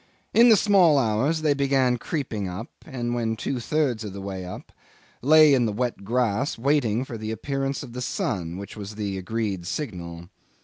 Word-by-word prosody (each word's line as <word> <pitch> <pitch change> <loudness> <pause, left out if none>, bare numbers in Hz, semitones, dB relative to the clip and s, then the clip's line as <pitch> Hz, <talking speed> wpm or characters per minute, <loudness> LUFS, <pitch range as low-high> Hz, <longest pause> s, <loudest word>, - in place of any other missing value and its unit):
In 235 +2 +7
the 225 - +8
small 185 -7 +5
hours 135 +7 +1
they 150 -2 +4
began 135 -3 +2
creeping 115 - -3
up, 90 +6 -6 0.2
and 120 -2 -3
when 115 -2 -1
two 125 +3 -3
thirds 130 -3 0
of 105 -3 -6
the 100 - -7
way 95 -1 -5
up, 90 - -9 0.5
lay 155 +2 +7
in 125 -3 +3
the - - -1
wet 120 0 -2
grass 120 +4 0
waiting 125 -2 +1
for 115 -4 -7
the 110 0 -5
appearance 135 +4 -3
of 120 -4 -10
the 125 - -5
sun, 90 -7 -2
which 100 +1 -8
was 105 0 -7
the 100 -3 -3
agreed 100 -3 -3
signal. 85 - -5
120 Hz, 185 wpm, -25 LUFS, 100-140 Hz, 0.5 s, the